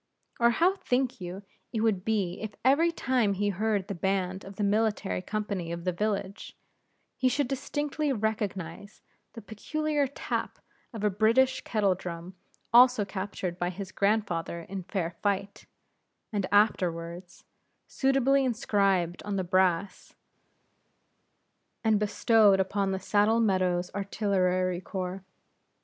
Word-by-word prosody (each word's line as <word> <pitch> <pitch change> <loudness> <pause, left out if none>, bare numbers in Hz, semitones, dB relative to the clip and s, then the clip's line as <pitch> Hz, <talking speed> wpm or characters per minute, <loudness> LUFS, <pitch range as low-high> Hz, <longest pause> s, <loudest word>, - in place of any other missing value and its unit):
Or 235 0 +5
how 350 +11 +2
think 250 - -1
you 180 +3 -6 0.3
it 225 - -2
would 215 -5 +1
be 195 -5 -1
if 215 -1 -6
every 310 +6 +4
time 250 -9 +1
he 205 +1 0
heard 205 0 -1
the 200 - -3
band 190 +1 -1
of 195 0 -10
the 210 - -2
military 205 -2 0
company 200 -4 -3
of 170 0 -5
the 180 - 0
village, 200 +1 -3 0.6
he 255 - +2
should 280 +1 0
distinctly 290 +2 -2
recognize 205 -5 -3 0.3
the 230 - -10
peculiar 295 +7 -1
tap 275 - -4 0.3
of 220 -3 -7
a 210 - +3
British 230 +6 +3
kettle 205 -4 +1
drum 175 0 -7 0.4
also 245 -3 +6
captured 190 -2 -5
by 175 - 0
his 190 +1 -7
grandfather 200 -5 0
in 190 +3 -6
fair 175 -4 -2
fight, 200 -1 -2 0.7
and 200 -2 -1
afterwards 175 -4 0 0.4
suitably 270 0 +2
inscribed 195 -7 +1
on 205 -1 -4
the 190 - 0
brass 185 +1 0 1.7
and 220 -2 +3
bestowed 210 -1 +4
upon 195 +1 0
the 190 - -2
Saddle 210 +4 +2
Meadows 185 -4 +1
Artillery 185 -3 0
Corps? 185 0 -5
200 Hz, 130 wpm, -28 LUFS, 185-225 Hz, 1.7 s, also